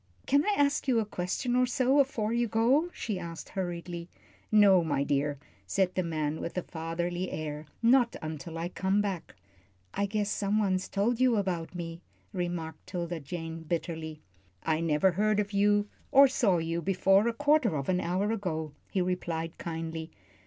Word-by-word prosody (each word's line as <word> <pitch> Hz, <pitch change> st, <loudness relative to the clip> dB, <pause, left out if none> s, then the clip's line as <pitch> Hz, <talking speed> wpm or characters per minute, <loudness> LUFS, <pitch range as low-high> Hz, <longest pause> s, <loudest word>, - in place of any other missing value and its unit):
"Can 280 Hz, +2 st, +3 dB
I 415 Hz, 0 st, +1 dB
ask 285 Hz, 0 st, +2 dB
you 245 Hz, -3 st, +4 dB
a 220 Hz, -, 0 dB
question 205 Hz, +6 st, -2 dB
or 250 Hz, 0 st, +4 dB
so 260 Hz, +2 st, +3 dB
afore 230 Hz, -5 st, +1 dB
you 235 Hz, 0 st, +1 dB
go?" 245 Hz, +10 st, +3 dB
she 210 Hz, -, -4 dB
asked, 170 Hz, -1 st, -7 dB
hurriedly. 175 Hz, -2 st, -4 dB, 0.4 s
"No, 200 Hz, -4 st, +6 dB
my 145 Hz, -3 st, 0 dB
dear," 145 Hz, +1 st, 0 dB, 0.3 s
said 185 Hz, -, +1 dB
the 185 Hz, -, +1 dB
man, 155 Hz, -3 st, -2 dB
with 170 Hz, -, -5 dB
a 180 Hz, -, 0 dB
fatherly 170 Hz, +2 st, -3 dB
air. 150 Hz, -1 st, -5 dB, 0.2 s
"Not 240 Hz, 0 st, +4 dB
until 155 Hz, +1 st, -6 dB
I 170 Hz, +1 st, -3 dB
come 190 Hz, +2 st, 0 dB
back." 195 Hz, -5 st, -3 dB, 0.6 s
"I 200 Hz, -, 0 dB
guess 210 Hz, 0 st, -1 dB
some 205 Hz, +1 st, 0 dB
one's 190 Hz, -3 st, +1 dB
told 225 Hz, +5 st, 0 dB
you 255 Hz, -2 st, +5 dB
about 185 Hz, -4 st, -2 dB
me," 170 Hz, -1 st, -6 dB, 0.3 s
remarked 175 Hz, -3 st, -4 dB
'Tilda 175 Hz, -2 st, -3 dB
Jane, 165 Hz, +2 st, -6 dB
bitterly. 160 Hz, -1 st, -4 dB, 0.4 s
"I 160 Hz, -1 st, +1 dB
never 165 Hz, +3 st, +3 dB
heard 210 Hz, +3 st, +2 dB
of 205 Hz, 0 st, -2 dB
you, 205 Hz, +1 st, +3 dB, 0.2 s
or 275 Hz, +1 st, +8 dB
saw 235 Hz, -8 st, +2 dB
you 165 Hz, +1 st, -2 dB
before 195 Hz, +3 st, +3 dB
a -, -, +3 dB
quarter 290 Hz, -, +3 dB
of 140 Hz, -2 st, -3 dB
an 180 Hz, -1 st, +1 dB
hour 185 Hz, +5 st, 0 dB
ago," 160 Hz, -8 st, -2 dB, 0.2 s
he 190 Hz, -3 st, 0 dB
replied, 170 Hz, -2 st, -2 dB
kindly. 165 Hz, -1 st, -4 dB
180 Hz, 175 wpm, -29 LUFS, 165-215 Hz, 0.6 s, or